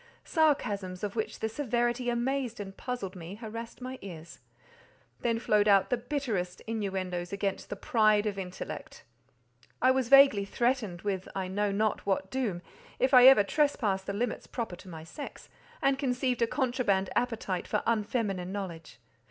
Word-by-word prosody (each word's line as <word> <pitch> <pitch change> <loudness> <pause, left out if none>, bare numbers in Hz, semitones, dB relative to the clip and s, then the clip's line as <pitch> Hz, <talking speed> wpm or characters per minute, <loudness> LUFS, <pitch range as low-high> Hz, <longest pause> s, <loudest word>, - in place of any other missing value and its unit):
Sarcasms 205 - +1
of 205 0 -3
which 220 - -3
the 220 - +1
severity 240 0 0
amazed 245 0 -1
and 195 -1 -7
puzzled 205 -7 -5
me, 175 +2 -8
harassed 230 +2 -8
my 255 +1 -6
ears; 170 -4 -9 0.8
then 230 -1 0
flowed 210 -2 +2
out 200 +1 +4
the - - +4
bitterest 235 -9 -3
inuendoes 190 -5 -3
against 200 -1 -2
the - - -3
"pride 215 0 +3
of 200 -2 -2
intellect." 180 -1 -7 0.8
I 255 - +5
was 260 -2 0
vaguely 275 -7 +7
threatened 220 -4 -1
with 195 -2 -2
I 190 -1 -2
know 205 +2 0
not 215 +2 0
what 190 -1 -1
doom, 220 -10 -2 0.3
if 260 +2 +1
I 250 0 +10
ever 265 -6 +8
trespassed 205 -7 +1
the 200 - -2
limits 235 +5 -2
proper 230 -7 -4
to 185 - -13
my 160 -2 -8
sex, 280 - -9 0.3
and 275 0 +3
conceived 255 -2 0
a 230 - +4
contraband 240 -8 0
appetite 225 -7 -1
for 210 - 0
unfeminine 210 -5 -1
knowledge. 175 -6 -6
215 Hz, 160 wpm, -30 LUFS, 195-250 Hz, 0.8 s, I